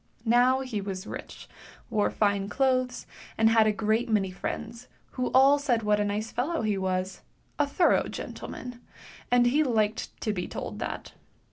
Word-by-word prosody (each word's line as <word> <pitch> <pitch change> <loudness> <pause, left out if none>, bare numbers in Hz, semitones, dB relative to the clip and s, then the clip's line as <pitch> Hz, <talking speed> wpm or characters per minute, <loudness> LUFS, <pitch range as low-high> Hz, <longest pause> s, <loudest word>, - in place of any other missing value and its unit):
Now 245 +3 +4
he 245 -6 -3
was 195 -1 -5
rich, - - -8 0.4
wore 210 -1 +2
fine 200 -1 0
clothes, 255 +1 0 0.3
and 225 0 +4
had 225 -1 +5
a - - +4
great 220 +3 0
many 200 -4 +1
friends, 230 +5 -6 0.2
who 255 -1 -2
all 275 +2 +6
said 245 -6 0
what 210 0 +2
a - - +2
nice 210 +2 -2
fellow 290 +4 -1
he 215 -2 +1
was 185 0 -2 0.2
— - - -39
a 290 - +3
thorough 340 +5 +3
gentleman 245 -1 -7 0.2
— - - -19
and 245 0 +5
he 270 +6 +3
liked 220 -5 -1
to 215 - -1
be 180 -3 -3
told - - -6
that. - - -5
225 Hz, 175 wpm, -27 LUFS, 205-255 Hz, 0.4 s, all